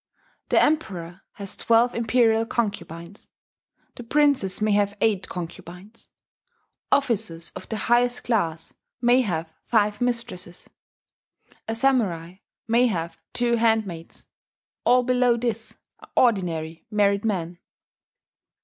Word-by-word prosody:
The -, -, +4 dB
Emperor 185 Hz, -, -1 dB
has 200 Hz, -2 st, -6 dB
twelve 235 Hz, +1 st, +3 dB
imperial 225 Hz, -1 st, +2 dB
concubines. 200 Hz, -5 st, -4 dB, 0.7 s
The -, -, -7 dB
princes 270 Hz, -7 st, +2 dB
may 215 Hz, 0 st, +1 dB
have 205 Hz, 0 st, +1 dB
eight 205 Hz, -3 st, +1 dB
concubines. 180 Hz, +4 st, -9 dB, 0.8 s
Officers 215 Hz, -11 st, 0 dB
of -, -, -10 dB
the 220 Hz, -, -3 dB
highest 245 Hz, +2 st, +1 dB
class 165 Hz, -9 st, -1 dB, 0.3 s
may 245 Hz, +1 st, +4 dB
have 165 Hz, -7 st, -3 dB
five 210 Hz, -2 st, +1 dB
mistresses. 230 Hz, -8 st, -3 dB, 1.0 s
A 225 Hz, -, -2 dB
Samurai 195 Hz, -9 st, 0 dB, 0.3 s
may 235 Hz, +2 st, +4 dB
have 170 Hz, -6 st, -3 dB
two 240 Hz, -1 st, +1 dB
handmaids. 220 Hz, -8 st, -1 dB, 0.6 s
All 250 Hz, +1 st, +5 dB
below 250 Hz, -1 st, +2 dB
this 230 Hz, -1 st, -4 dB, 0.2 s
are -, -, -15 dB
ordinary 170 Hz, -8 st, +1 dB
married 200 Hz, -1 st, +2 dB
men." 175 Hz, -5 st, -2 dB
215 Hz, 110 wpm, -24 LUFS, 180-235 Hz, 1.0 s, All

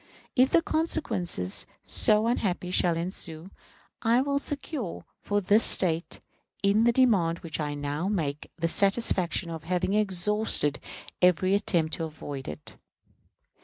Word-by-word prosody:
If 260 Hz, 0 st, +3 dB
consequences 210 Hz, -, 0 dB, 0.2 s
so 215 Hz, 0 st, +4 dB
unhappy 190 Hz, -6 st, -1 dB
shall 175 Hz, -2 st, +2 dB
ensue, 170 Hz, 0 st, -6 dB, 0.5 s
I 230 Hz, +1 st, +3 dB
will 280 Hz, +1 st, 0 dB
secure 285 Hz, -, -6 dB, 0.2 s
for 205 Hz, 0 st, -1 dB
this 210 Hz, +4 st, +3 dB
State, 170 Hz, -2 st, 0 dB, 0.4 s
in 205 Hz, +3 st, +3 dB
the 235 Hz, -, +5 dB
demand 205 Hz, -10 st, +2 dB
which 160 Hz, -3 st, -4 dB
I 150 Hz, -1 st, -3 dB
now 145 Hz, +4 st, -3 dB
make, 155 Hz, -8 st, -3 dB
the 165 Hz, 0 st, 0 dB
satisfaction 190 Hz, -3 st, +1 dB
of 160 Hz, -1 st, -7 dB
having 180 Hz, +2 st, -1 dB
exhausted 210 Hz, -6 st, +2 dB, 0.4 s
every 180 Hz, +1 st, +3 dB
attempt 170 Hz, -5 st, 0 dB
to 165 Hz, -, -3 dB
avoid 145 Hz, -3 st, -8 dB
it. 75 Hz, -, -8 dB
185 Hz, 130 wpm, -27 LUFS, 165-215 Hz, 0.5 s, the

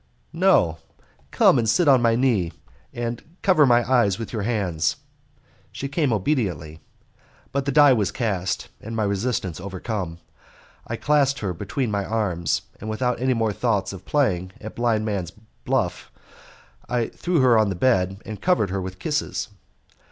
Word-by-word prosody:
"No, 160 Hz, -, +3 dB, 0.5 s
come 130 Hz, -, +4 dB
and 110 Hz, -2 st, +1 dB
sit 175 Hz, +6 st, +3 dB
on 135 Hz, -3 st, +6 dB
my 115 Hz, -1 st, +3 dB
knee, 115 Hz, -9 st, +1 dB, 0.4 s
and 120 Hz, 0 st, -4 dB, 0.2 s
cover 175 Hz, -7 st, +5 dB
my 120 Hz, -1 st, +4 dB
eyes 120 Hz, -7 st, +3 dB
with 115 Hz, +1 st, -7 dB
your 110 Hz, -, -2 dB
hands." 100 Hz, -8 st, 0 dB, 0.8 s
She 140 Hz, -, -5 dB
came 140 Hz, -1 st, 0 dB
obediently, 95 Hz, -, -1 dB, 0.7 s
but 140 Hz, 0 st, -1 dB
the 140 Hz, -, 0 dB
die 145 Hz, -1 st, +7 dB
was 105 Hz, -5 st, 0 dB
cast, 95 Hz, -6 st, -2 dB
and 115 Hz, +2 st, -6 dB
my 110 Hz, -, 0 dB
resistance 100 Hz, -4 st, -1 dB
overcome. 95 Hz, -2 st, -4 dB, 0.7 s
I -, -, -3 dB
clasped 145 Hz, -2 st, +2 dB
her 95 Hz, -4 st, -2 dB
between 120 Hz, +7 st, -3 dB
my 100 Hz, -1 st, 0 dB
arms, 95 Hz, -7 st, -1 dB, 0.2 s
and 110 Hz, -, -6 dB
without 125 Hz, +2 st, -1 dB
any 130 Hz, 0 st, +2 dB
more 110 Hz, -2 st, 0 dB
thoughts 105 Hz, -3 st, 0 dB
of 95 Hz, -1 st, -9 dB
playing 95 Hz, -11 st, 0 dB
at 110 Hz, -, -8 dB
blind 115 Hz, -3 st, +1 dB
man's 100 Hz, -6 st, -3 dB, 0.3 s
buff -, -, -1 dB, 0.8 s
I 120 Hz, -2 st, 0 dB
threw 175 Hz, -2 st, -1 dB
her 125 Hz, -2 st, +5 dB
on 110 Hz, -2 st, +3 dB
the 95 Hz, -, -2 dB
bed 95 Hz, -4 st, +1 dB
and 110 Hz, -2 st, -7 dB
covered 175 Hz, -, +2 dB
her 95 Hz, 0 st, -2 dB
with 95 Hz, 0 st, -6 dB
kisses. 150 Hz, -, -2 dB
110 Hz, 160 wpm, -23 LUFS, 95-130 Hz, 0.8 s, die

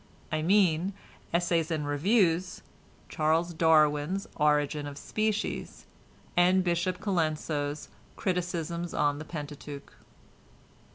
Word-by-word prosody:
I 155 Hz, 0 st, 0 dB
mean 185 Hz, 0 st, +3 dB, 0.4 s
"Essays 170 Hz, -1 st, +1 dB
and 155 Hz, -3 st, -1 dB
Reviews," 180 Hz, +3 st, +1 dB, 0.4 s
Charles 160 Hz, +3 st, +1 dB
Darwin's 160 Hz, +2 st, +3 dB
"Origin 150 Hz, -1 st, +1 dB
of 140 Hz, -1 st, -8 dB
Species," 215 Hz, +6 st, -2 dB, 0.5 s
and 185 Hz, +1 st, +4 dB
Bishop 180 Hz, +1 st, 0 dB
Colenso's 155 Hz, -6 st, -1 dB, 0.3 s
"Criticisms 175 Hz, -2 st, -2 dB
on 145 Hz, -1 st, +1 dB
the 155 Hz, -, -7 dB
Pentateuch." 145 Hz, -2 st, -8 dB
165 Hz, 95 wpm, -29 LUFS, 150-180 Hz, 0.5 s, and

